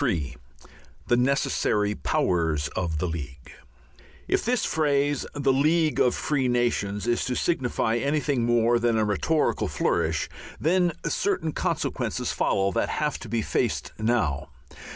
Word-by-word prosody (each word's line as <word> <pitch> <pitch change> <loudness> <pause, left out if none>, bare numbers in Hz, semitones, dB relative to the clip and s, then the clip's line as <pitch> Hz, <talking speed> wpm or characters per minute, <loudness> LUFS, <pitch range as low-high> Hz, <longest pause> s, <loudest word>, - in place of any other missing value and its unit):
III 85 - -1 0.7
THE 120 - +5
NECESSARY 125 -5 +1
POWERS 80 -8 0
OF 80 0 -2
THE 80 - -1
LEAGUE 70 -5 -6 0.8
If - - +1
this 245 +1 +1
phrase, 145 -2 +1
"the 140 -2 +2
League 155 +3 +2
of 125 - +3
Free 140 -4 0
Nations," 120 -5 0
is 120 0 +1
to 125 - -2
signify 125 -8 0
anything 140 -1 0
more 120 0 +3
than 115 -1 +1
a 110 - +2
rhetorical 145 +10 +1
flourish, - - 0 0.3
then 175 +1 +2
certain 185 -6 0
consequences - - -2
follow 100 0 +1
that - - 0
have 150 -1 -1
to 115 - -9
be 115 0 0
faced - - -1
now. 110 - 0
120 Hz, 135 wpm, -26 LUFS, 100-145 Hz, 0.8 s, THE